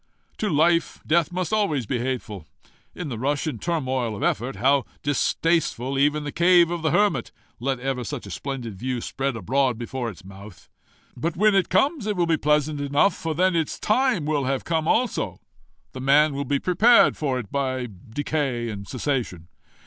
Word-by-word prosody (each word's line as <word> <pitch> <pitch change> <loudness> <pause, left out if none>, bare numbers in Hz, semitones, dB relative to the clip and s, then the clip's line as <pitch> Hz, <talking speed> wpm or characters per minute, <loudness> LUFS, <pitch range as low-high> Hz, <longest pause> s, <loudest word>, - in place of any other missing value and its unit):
To 215 - 0
life, 165 +2 +2
death 165 0 +2
must 180 +1 -3
be - - +3
always 155 - 0
hateful. 120 -8 -3 0.5
In 170 -4 -5
the 115 -4 -5
rush 145 +5 -1
and 155 - -4
turmoil 130 -9 -1
of - - -5
effort, 125 +5 -1
how 135 +1 +3 0.2
distasteful 145 -2 0
even 150 +2 +2
the 145 - -4
cave 175 0 +4
of 175 -1 -3
the 160 - +1
hermit 205 +6 +1 0.3
let 135 +1 -1
ever 130 -1 -2
such 140 +1 -6
a - - -9
splendid 125 -6 -5
view 125 0 -2
spread 135 +2 -3
abroad 125 +4 0
before 120 +1 -4
its 90 -4 -12
mouth! 100 0 -13 0.5
But 165 +1 -3
when 210 +2 +4
it 195 -1 +2
comes 265 - +1
it 210 - 0
will 175 -2 +1
be 165 -1 +2
pleasant 150 -1 +1
enough, 145 +7 +2
for 160 -1 -4
then 185 +2 +2
its 160 -2 -1
time 240 - +1
will 150 -3 0
have 135 0 -1
come 160 -1 -1
also 240 +3 0 0.5
the 130 - -8
man 145 +3 +4
will 140 +1 -3
be 140 +2 +1
prepared 210 - +5
for 135 -4 -1
it 115 -6 -6
by 130 -3 -1 0.2
decay 135 -2 -2
and 100 -2 -7
cessation. 120 - -3
145 Hz, 185 wpm, -24 LUFS, 125-170 Hz, 0.5 s, prepared